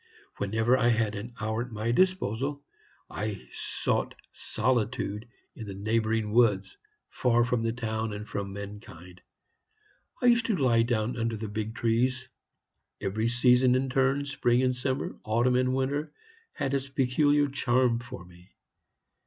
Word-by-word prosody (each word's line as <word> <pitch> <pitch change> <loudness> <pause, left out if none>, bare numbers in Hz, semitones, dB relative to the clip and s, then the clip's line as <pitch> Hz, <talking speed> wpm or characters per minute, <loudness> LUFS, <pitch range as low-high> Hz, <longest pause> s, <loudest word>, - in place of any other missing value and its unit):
Whenever 110 +5 +2
I 125 -2 +2
had 110 -3 +2
an 115 +3 -7
hour 110 0 -1
at 125 0 -6
my 110 +2 -2
disposal, 145 - +1 0.4
I 105 -2 -5
sought - - -2 0.2
solitude 120 -3 -1 0.3
in 110 - -8
the 100 - -6
neighboring 110 +1 0
woods, 105 -4 +3 0.3
far 120 -2 +2
from 125 -1 0
the 115 0 0
town 110 -2 -3
and 105 +1 -6
from 100 -1 -4
mankind. 95 -3 -10 1.0
I - - -2
used 235 -1 +4
to 220 - +1
lie 120 -5 +3
down 115 +1 0
under 115 -1 -1
the 110 +1 -5
big 110 +2 -4
trees. 125 +3 0 0.7
Every 110 +4 -1
season 125 +1 +4
in 130 0 0
turn, 135 +2 +2
spring 125 -3 +1
and 130 0 +2
summer, 130 +1 -3
autumn 120 +3 +2
and 130 0 +2
winter, 140 +3 -1 0.4
had 135 - -2
its 135 0 -1
peculiar 145 +2 +2
charm 125 -3 +2
for 120 -7 -9
me. 90 +2 -19
120 Hz, 145 wpm, -28 LUFS, 110-130 Hz, 1.0 s, used